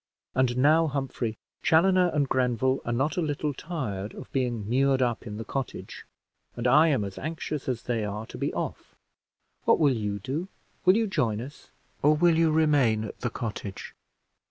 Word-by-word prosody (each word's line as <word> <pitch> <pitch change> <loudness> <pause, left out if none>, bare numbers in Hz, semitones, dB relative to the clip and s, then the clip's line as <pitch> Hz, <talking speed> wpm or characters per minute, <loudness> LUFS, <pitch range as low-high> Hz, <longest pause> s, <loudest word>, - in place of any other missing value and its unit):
And 125 -1 +1
now, 155 +5 +4
Humphrey, 135 -6 -3 0.2
Chaloner 180 +2 +4
and 145 -2 +1
Grenville 130 +1 +1
are 120 - -1
not 135 +7 0
a - - +2
little 150 -1 -1
tired 120 - -5
of 130 - -10
being 120 -6 -1
mured 135 +3 +2
up 120 -2 0
in 105 -1 -6
the 115 - -6
cottage, 135 -2 -5 0.5
and 120 - -4
I 150 +6 +6
am 135 -9 +2
as 100 -1 -6
anxious 155 -3 -4
as 120 -2 -2
they 115 -3 -1
are 105 +1 -4
to - - -10
be - - -1
off. - - -5 0.7
What - - +5
will 145 -4 +4
you 105 -2 -2
do? 140 - -4 0.4
Will 185 +3 +6
you 225 - +2
join 120 - 0
us, 135 +5 -10 0.3
or 150 +2 +5
will 170 +1 +4
you 165 0 +4
remain 145 -9 +3
at 110 - -7
the 120 - -1
cottage?" 110 -4 -6
130 Hz, 180 wpm, -27 LUFS, 115-155 Hz, 0.7 s, I